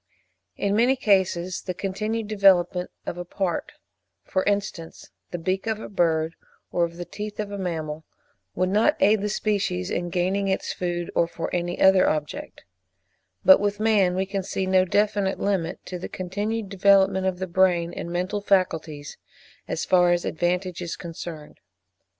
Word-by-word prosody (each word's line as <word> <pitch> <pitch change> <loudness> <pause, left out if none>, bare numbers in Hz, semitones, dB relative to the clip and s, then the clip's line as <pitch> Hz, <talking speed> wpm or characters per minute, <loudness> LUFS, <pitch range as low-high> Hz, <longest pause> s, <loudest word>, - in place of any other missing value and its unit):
In 200 0 0
many 245 +4 +4
cases 190 -6 +1
the 185 - -5
continued 215 +4 -3
development 190 -4 +3 0.2
of 175 - -5
a - - -3
part, 180 0 -3 0.5
for 185 - -1
instance, 200 -5 -2
of - - -23 0.2
the 175 - -4
beak 185 +5 -2
of 220 -1 -1
a - - -7
bird, 165 -4 +1 0.4
or 175 - +2
of 170 0 -9
the 175 - -5
teeth 210 +2 -7
of 210 -1 -3
a 200 - -4
mammal, 160 -4 -4 0.5
would 185 0 +1
not 210 +3 +3
aid 210 +1 +4
the 210 - -1
species 200 - -1
in 175 0 -2
gaining 185 +3 0
its 190 - -1
food, 175 -1 -3
or 170 - +2
for 165 - -5
any 175 0 -2
other 190 -1 +6
object; 155 - -4 0.8
but 285 - +9
with 205 0 -1
man 205 -5 +3
we 190 +1 0
can 195 0 -3
see 190 0 -3
no 185 0 +3
definite 205 0 +1
limit 190 -4 -1
to 180 - -6
the - - -6
continued 205 +4 -3
development 195 -1 +4
of 185 -1 -1
the 185 - -3
brain 175 -2 +2
and 170 - -6
mental 185 +4 -2
faculties, 160 -7 0 0.5
as - - -2
far 180 -1 +4
as 175 0 +1
advantage 180 +2 -1
is 170 -2 -4
concerned. 165 -2 -8
185 Hz, 170 wpm, -25 LUFS, 175-200 Hz, 0.8 s, but